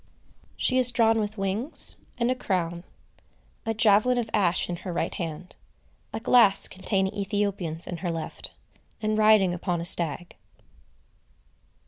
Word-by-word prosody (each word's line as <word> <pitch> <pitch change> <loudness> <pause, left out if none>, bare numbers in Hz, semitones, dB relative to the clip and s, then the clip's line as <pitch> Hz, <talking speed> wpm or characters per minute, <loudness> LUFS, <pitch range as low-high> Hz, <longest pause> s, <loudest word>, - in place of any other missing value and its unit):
She 255 0 +1
is 250 -1 +4
drawn 225 -2 +2
with 210 0 -4
wings, 200 +9 +3 0.2
and 240 +1 0
a - - 0
crown; 175 -7 -3 0.8
a 225 - 0
javelin 220 +3 +3
of 230 -3 -3
ash 185 -4 +1
in 175 - -4
her 185 +1 -7
right 170 - -3
hand; 170 +1 -7 0.6
a - - -5
glass 225 -4 +4
containing 190 0 -2
Ethiopians 195 -5 -2
in 175 - -6
her 175 +1 -4
left; 165 -1 -7 0.4
and 215 0 -1
riding 215 -4 +4
upon 175 0 -3
a 170 - -4
stag. 170 0 -1
195 Hz, 140 wpm, -25 LUFS, 175-220 Hz, 0.8 s, is